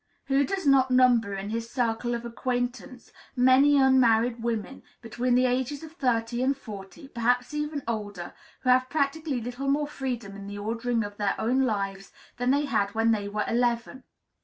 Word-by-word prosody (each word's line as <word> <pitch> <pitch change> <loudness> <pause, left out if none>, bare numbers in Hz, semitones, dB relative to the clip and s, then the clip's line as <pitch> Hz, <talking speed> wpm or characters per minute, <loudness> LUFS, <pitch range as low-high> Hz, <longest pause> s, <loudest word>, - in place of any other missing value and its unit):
Who 275 0 +2
does 390 0 -3
not 270 -2 +4
number 245 -5 +3
in 195 +2 -5
his 230 +1 -3
circle 240 0 -1
of 235 0 -6
acquaintance 245 0 -4 0.2
many 260 +3 +5
unmarried 245 -3 +4
women, 235 +2 -3 0.2
between 245 +2 -1
the 255 +1 +4
ages 260 +4 -1
of 320 - -9
thirty 240 -6 -1
and 270 +1 +1
forty, 210 +2 -10
perhaps 245 +2 0
even 300 -1 -3
older, 205 -6 -4 0.3
who 255 - -1
have 255 0 +3
practically 295 -1 -1
little 245 +4 -5
more 290 +2 +2
freedom 250 -8 -5
in 200 0 -9
the 205 0 -7
ordering 230 +2 -1
of 205 0 -8
their 205 -1 0
own 250 +4 +1
lives 195 -3 -3 0.3
than 245 +1 0
they 285 +2 +2
had 210 -6 -1
when 225 +1 +3
they 205 -2 -1
were 210 0 -2
eleven? 240 +2 -1
245 Hz, 175 wpm, -27 LUFS, 225-265 Hz, 0.3 s, many